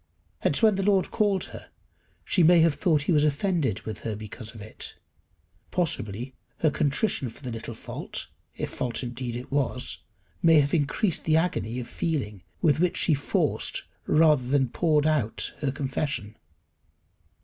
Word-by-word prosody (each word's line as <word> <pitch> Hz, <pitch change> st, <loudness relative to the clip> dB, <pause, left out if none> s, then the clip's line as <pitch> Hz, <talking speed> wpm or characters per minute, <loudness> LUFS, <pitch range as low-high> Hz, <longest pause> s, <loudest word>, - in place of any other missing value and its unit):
Hence 145 Hz, -, +1 dB
when 215 Hz, -1 st, +7 dB
the 195 Hz, -, -1 dB
Lord 195 Hz, -1 st, +2 dB
called 200 Hz, -3 st, +1 dB
her -, -, -10 dB, 0.6 s
she 185 Hz, -, +3 dB
may 170 Hz, +1 st, +7 dB
have 165 Hz, -2 st, +4 dB
thought 150 Hz, 0 st, +2 dB
he 180 Hz, -, 0 dB
was 150 Hz, -3 st, +4 dB
offended 150 Hz, -, +1 dB
with 110 Hz, -, -3 dB
her 110 Hz, -2 st, -3 dB
because 110 Hz, +1 st, -9 dB
of -, -, -9 dB
it. 105 Hz, +1 st, -7 dB, 0.7 s
Possibly 125 Hz, -, -2 dB, 0.3 s
her 155 Hz, -, +4 dB
contrition 140 Hz, -, +1 dB
for 115 Hz, -, -14 dB
the 125 Hz, -, -4 dB
little 115 Hz, 0 st, -6 dB
fault, -, -, -6 dB, 0.3 s
if -, -, -4 dB
fault 125 Hz, 0 st, -3 dB
indeed 120 Hz, 0 st, -4 dB
it 125 Hz, +2 st, -7 dB
was, 135 Hz, -2 st, -1 dB, 0.4 s
may 165 Hz, -2 st, +6 dB
have 140 Hz, 0 st, +1 dB
increased 160 Hz, +4 st, +1 dB
the 155 Hz, 0 st, +4 dB
agony 125 Hz, -8 st, -1 dB
of 120 Hz, -, -6 dB
feeling 125 Hz, -, -2 dB, 0.2 s
with 155 Hz, -2 st, +4 dB
which 180 Hz, 0 st, +2 dB
she 165 Hz, -, +4 dB
forced 140 Hz, 0 st, 0 dB, 0.2 s
rather 150 Hz, -5 st, +4 dB
than 135 Hz, -1 st, +2 dB
poured 155 Hz, +1 st, +2 dB
out 150 Hz, -8 st, 0 dB
her 140 Hz, -3 st, 0 dB
confession. 135 Hz, -5 st, -3 dB
145 Hz, 160 wpm, -26 LUFS, 120-165 Hz, 0.7 s, when